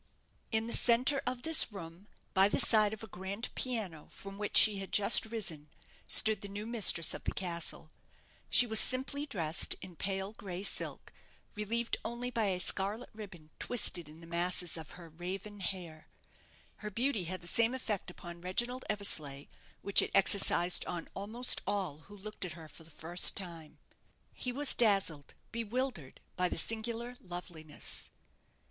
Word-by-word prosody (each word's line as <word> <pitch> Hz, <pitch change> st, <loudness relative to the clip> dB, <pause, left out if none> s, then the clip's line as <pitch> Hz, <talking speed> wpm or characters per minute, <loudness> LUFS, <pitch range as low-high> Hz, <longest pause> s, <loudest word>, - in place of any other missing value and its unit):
In 220 Hz, 0 st, 0 dB
the 235 Hz, -, -3 dB
centre 255 Hz, +4 st, +3 dB
of 250 Hz, -1 st, -3 dB
this 320 Hz, -6 st, +6 dB
room, 175 Hz, 0 st, -10 dB, 0.3 s
by 195 Hz, +1 st, +5 dB
the -, -, 0 dB
side 215 Hz, -4 st, +6 dB
of 220 Hz, 0 st, -8 dB
a -, -, -8 dB
grand 195 Hz, +5 st, -6 dB
piano, 210 Hz, -, -3 dB
from 195 Hz, 0 st, -10 dB
which 210 Hz, -, +1 dB
she 210 Hz, -3 st, +8 dB
had 195 Hz, -, -7 dB
just 210 Hz, +2 st, +5 dB
risen, 175 Hz, -10 st, -4 dB, 0.4 s
stood 215 Hz, -2 st, +6 dB
the 200 Hz, -, -7 dB
new 205 Hz, +2 st, -7 dB
mistress 215 Hz, -8 st, +3 dB
of -, -, -8 dB
the -, -, -2 dB
castle. 170 Hz, -3 st, -3 dB, 0.6 s
She 245 Hz, -, +8 dB
was 220 Hz, -2 st, +3 dB
simply 280 Hz, +3 st, +1 dB
dressed 170 Hz, -, +1 dB
in 185 Hz, -2 st, -11 dB
pale 195 Hz, +3 st, -3 dB
gray 190 Hz, -3 st, -7 dB
silk, -, -, -4 dB, 0.4 s
relieved 230 Hz, +3 st, -2 dB
only 245 Hz, +1 st, -5 dB
by 225 Hz, -3 st, -1 dB
a 185 Hz, -2 st, -1 dB
scarlet 200 Hz, +6 st, -1 dB
ribbon 190 Hz, -8 st, -12 dB
twisted 175 Hz, -9 st, 0 dB
in 155 Hz, +2 st, -14 dB
the -, -, -12 dB
masses 175 Hz, +1 st, 0 dB
of 160 Hz, -2 st, -7 dB
her 170 Hz, -2 st, -11 dB
raven 185 Hz, +5 st, -7 dB
hair. 175 Hz, -4 st, -7 dB, 0.7 s
Her 210 Hz, -, -6 dB
beauty 230 Hz, -2 st, -1 dB
had 185 Hz, +2 st, -5 dB
the -, -, -9 dB
same 230 Hz, +5 st, +1 dB
effect 215 Hz, -8 st, -4 dB
upon 175 Hz, -1 st, -10 dB
Reginald 240 Hz, +8 st, -2 dB
Eversleigh 155 Hz, -9 st, 0 dB, 0.4 s
which 200 Hz, -, +6 dB
it -, -, -3 dB
exercised 190 Hz, -2 st, +3 dB
on 170 Hz, -2 st, -6 dB
almost 225 Hz, +6 st, -1 dB
all 190 Hz, -7 st, -3 dB
who 205 Hz, +1 st, -13 dB
looked 210 Hz, +1 st, -7 dB
at 180 Hz, -3 st, -5 dB
her 160 Hz, -1 st, -11 dB
for 160 Hz, -, -14 dB
the 160 Hz, -, -7 dB
first 165 Hz, +3 st, +4 dB
time. 170 Hz, -5 st, -8 dB, 0.6 s
He 250 Hz, -, -4 dB
was 280 Hz, +3 st, +3 dB
dazzled, 195 Hz, -, +2 dB, 0.2 s
bewildered, 230 Hz, -, -4 dB
by 180 Hz, 0 st, 0 dB
the -, -, -4 dB
singular 230 Hz, +5 st, -3 dB
loveliness. 175 Hz, -4 st, -7 dB
195 Hz, 165 wpm, -32 LUFS, 175-225 Hz, 0.7 s, she